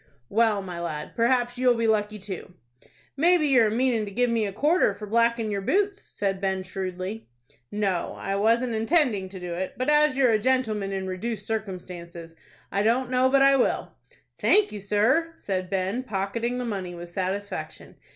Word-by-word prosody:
"Well, 220 -2 +2
my 180 -2 -6
lad, 155 -3 -4
perhaps 245 +1 +1
you'll 250 -1 +4
be 230 0 0
lucky 210 -1 +1
too." 190 -2 -8 0.6
"Maybe 335 +2 +4
you're 245 -6 +5
meanin' 235 0 +1
to 200 - -8
give 245 +3 +1
me 225 -2 +1
a - - -4
quarter 290 - +2
for 210 +1 -8
blackin' 230 0 +1
your 200 -1 -2
boots," 400 - 0
said 195 -1 -3
Ben, 190 -1 -1
shrewdly. 185 +3 -5 0.4
"No, 195 -4 -1
I 195 - -3
wasn't 230 +4 +2
intending 225 - +1
to 190 0 -9
do 180 -1 -5
it; 185 +2 -4
but, 255 +3 -1
as 300 -2 +4
you're 260 -3 +4
a 215 - +3
gentleman 220 -5 0
in 190 -1 -3
reduced 200 +3 -4
circumstances, 180 -5 -6 0.4
I 200 - +1
don't 240 +4 +1
know 255 +1 +3
but 275 0 +4
I 275 0 +6
will." 255 - 0 0.5
"Thank 420 0 +4
you, 210 - -6
sir," 220 - +1
said 185 - -3
Ben, 195 +5 -1
pocketing 230 +2 -2
the 250 - -3
money 190 -6 -4
with 170 0 -8
satisfaction. 195 +3 -4
215 Hz, 180 wpm, -25 LUFS, 190-250 Hz, 0.6 s, I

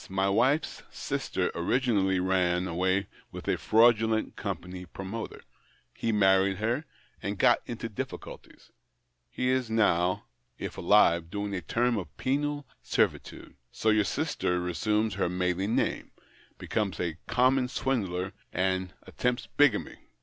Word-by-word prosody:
My 95 +1 +1
wife's 135 +10 +1
sister - - -2
originally 95 0 +1
ran 90 -1 +1
away 95 +3 +1 0.3
with - - -9
a - - +2
fraudulent 110 -1 +3
company 90 0 -5
promoter; 95 +6 -6 0.5
he 115 - -1
married 95 -2 +3
her, 120 +9 -1 0.4
and - - -3
got - - +4
into - - -4
difficulties; - - -8 0.6
he 125 - -1
is 130 -2 +1
now, 95 -4 +2 0.3
if - - -5
alive, 85 -1 +4
doing 100 +1 -3
a 95 - -2
term 120 +6 +1
of 75 -11 -6
penal 145 +2 -1 0.2
servi - - +1
tude; - - -12 0.2
so 110 - +1
your 105 -1 +4
sister 90 -2 -1
resumes 105 +4 0
her 95 -2 0
maiden 90 +4 0
name, - - -1 0.5
becomes 105 -4 -2
a 85 -2 -2
common 130 +1 +3
swindler, 95 -9 -2 0.2
and 95 0 -1
attempts 125 0 -2
bigamy. 145 -8 +3
100 Hz, 130 wpm, -28 LUFS, 90-115 Hz, 0.6 s, got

